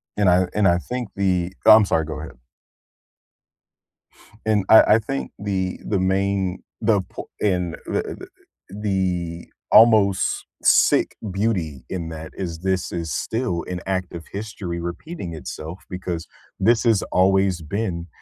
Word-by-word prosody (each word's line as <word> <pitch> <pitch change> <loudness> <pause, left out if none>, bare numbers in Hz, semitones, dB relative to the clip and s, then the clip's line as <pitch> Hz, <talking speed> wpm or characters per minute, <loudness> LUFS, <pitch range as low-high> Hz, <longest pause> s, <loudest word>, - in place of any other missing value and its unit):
And 100 -3 +3
I 90 +1 +4
and 105 -2 +3
I 85 - +4
think 125 +5 -5
the 95 -2 0
Oh, 110 - +10
I'm 110 -1 +5
sorry, 80 -4 +1
go 75 -1 -6
ahead. 80 - -9 2.1
And 105 -3 +2
I 110 - +10
I - - +3
think 135 +5 -4
the 95 -2 -2
the 100 - 0
main 95 0 0 0.2
the 110 -3 +3
po 90 - -10
and 90 -5 0
the - - -1
the - - -8 0.5
the 90 -4 -1 0.3
almost 110 -4 +5 0.2
sick - - +4 0.2
beauty 90 - -1
in 85 -3 -4
that 80 -1 -8
is, 85 -4 -4
this 95 +1 -1
is 85 -2 -4
still 110 - -2
an 90 -1 -3
active 95 -3 -3
history 100 -4 -5
repeating 85 - -6
itself 80 +2 -7
because 90 -3 -4 0.3
this 115 +4 +3
has 115 -4 +3
always 95 -1 +3
been 85 0 -3
95 Hz, 140 wpm, -22 LUFS, 85-105 Hz, 2.1 s, Oh